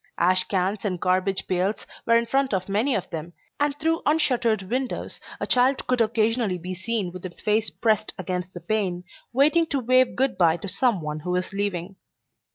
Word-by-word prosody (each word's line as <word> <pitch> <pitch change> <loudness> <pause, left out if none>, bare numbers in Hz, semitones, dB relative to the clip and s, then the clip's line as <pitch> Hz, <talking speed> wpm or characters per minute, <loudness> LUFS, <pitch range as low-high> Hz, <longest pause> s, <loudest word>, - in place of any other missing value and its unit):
Ash 185 +2 +4
cans 190 +2 -1
and 185 -4 -2
garbage 185 +2 0
pails 185 +3 -1 0.2
were 230 - +5
in 235 - +1
front 265 -1 +1
of 185 -1 -3
many 220 +7 +1
of 195 - -2
them, 165 +1 -6 0.3
and 290 0 +1
through 325 +2 0
unshuttered 250 -9 +2
windows 255 +6 -3 0.2
a - - -2
child 255 +2 +2
could 250 -1 +1
occasionally 225 -2 +1
be 180 +2 -6
seen 195 0 -2
with 185 0 -9
its 180 -2 -8
face 215 +1 +1
pressed 215 -2 0
against 180 0 -4
the 175 - -7
pane, 180 -1 -1 0.3
waiting 305 +6 +3
to 280 - -1
wave 255 +1 +3
good 265 -3 0
by 170 -2 +4
to 185 - -7
some 230 -2 +1
one 150 0 -4
who 175 +4 -6
was 180 +1 -1
leaving. 195 -2 -3
205 Hz, 190 wpm, -25 LUFS, 185-245 Hz, 0.3 s, were